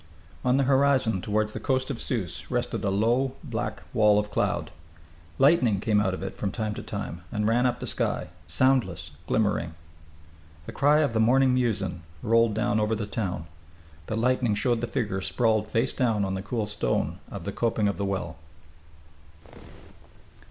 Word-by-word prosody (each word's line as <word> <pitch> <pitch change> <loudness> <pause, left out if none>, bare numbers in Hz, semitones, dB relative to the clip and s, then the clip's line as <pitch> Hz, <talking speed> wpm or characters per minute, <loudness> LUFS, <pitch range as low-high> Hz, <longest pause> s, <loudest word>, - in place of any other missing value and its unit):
On 125 +1 +3
the 140 - +3
horizon 130 -6 +3
toward 105 +2 0
the - - -5
coast 130 -1 0
of 120 - -5
Sousse 105 -10 -3
rested - - -2
a 100 - +1
low 120 +7 +1
black - - -4
wall 105 -1 +5
of 105 0 -1
cloud. - - -1 0.7
Lightning 130 - +4
came 105 0 +2
out 95 -3 0
of 95 - -7
it 95 - -5
from 100 - -2
time 110 -1 -2
to - - -6
time 85 +4 -5
and 105 -2 0
ran 120 +3 +3
up 125 - -2
the - - -5
sky, - - -2 0.2
soundless, 95 - +1 0.2
glimmering.... 100 -7 0 0.9
The - - -7
cry 150 +2 +4
of 145 -6 +1
the 110 - +1
morning 130 +3 +4
muezzin 110 -8 0 0.2
rolled 115 -1 +3
down 110 0 +1
over 105 +1 +1
the 105 -1 -3
town. 100 -6 -3 0.6
The 110 - -2
lightning 120 -2 +2
showed 115 +2 +1
the 120 - -1
figure 100 -4 -2
sprawled 110 0 +1
face 120 +3 0
down 115 -6 +1
on 95 - -2
the 95 - -3
cool 110 +2 -2
stone 105 0 -1
of - - -6
the - - -2
coping 110 -3 0
of 100 -4 -1
the 100 - -1
well.... 90 -6 -3
110 Hz, 175 wpm, -26 LUFS, 100-125 Hz, 0.9 s, wall